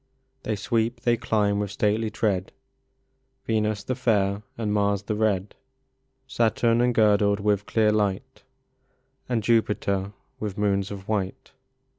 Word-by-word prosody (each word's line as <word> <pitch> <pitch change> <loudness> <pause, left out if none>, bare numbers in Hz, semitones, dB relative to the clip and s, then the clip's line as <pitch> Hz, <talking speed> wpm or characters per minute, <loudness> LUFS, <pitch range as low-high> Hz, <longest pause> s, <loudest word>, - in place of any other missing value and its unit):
They 110 - -2
sweep, 115 +3 -1
they 120 -1 +3
climb 105 -3 0
with 105 -1 -2
stately 105 +2 0
tread, 95 -4 -1 0.9
Venus 110 -2 0
the 130 - -2
fair 105 -5 +1 0.2
and 105 -3 -1
Mars 100 -1 +1
the 105 - -2
red, 105 -2 0 0.7
Saturn 115 0 +2
engirdled 105 -4 +3
with 105 0 0
clear 110 -2 +3
light, 105 +4 -1 0.9
And 115 -3 0
Jupiter 105 -3 +1 0.3
with 105 -1 -4
moons 100 -1 0
of 100 -2 -8
white. 100 -3 -3
105 Hz, 125 wpm, -25 LUFS, 100-110 Hz, 0.9 s, they